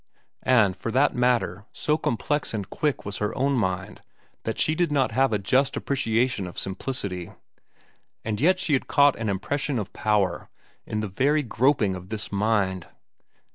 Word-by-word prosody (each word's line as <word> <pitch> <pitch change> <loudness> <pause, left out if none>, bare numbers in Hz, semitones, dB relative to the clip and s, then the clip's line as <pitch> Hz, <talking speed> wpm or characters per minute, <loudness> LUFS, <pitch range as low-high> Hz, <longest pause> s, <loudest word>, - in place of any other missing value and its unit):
And 110 -7 +3
for 115 - -5
that 140 +3 +3
matter 115 -6 +1
so 150 - +1
complex 145 -2 -1
and 100 -3 -4
quick 150 +5 -2
was 100 - -4
her 105 - -2
own 140 +2 +2
mind 95 -4 -2 0.4
that 110 - -2
she 155 - +2
did 170 -1 0
not 135 -3 +2
have 135 0 +2
a 105 - +2
just 130 +7 +1
appreciation 120 -6 0
of 90 - -10
simplicity. 95 -3 -4 0.9
And 105 0 -2
yet 185 +4 +4
she 185 -5 0
had 135 - +1
caught 145 -1 +5
an 110 -2 -2
impression 135 +8 -1
of 105 -4 -4
power 105 -3 0 0.4
in 105 - -2
the 110 - -2
very 145 +10 +1
groping 120 -4 +2
of 90 0 -8
this 110 -1 -4
mind. 100 -3 0
115 Hz, 170 wpm, -25 LUFS, 100-135 Hz, 0.9 s, caught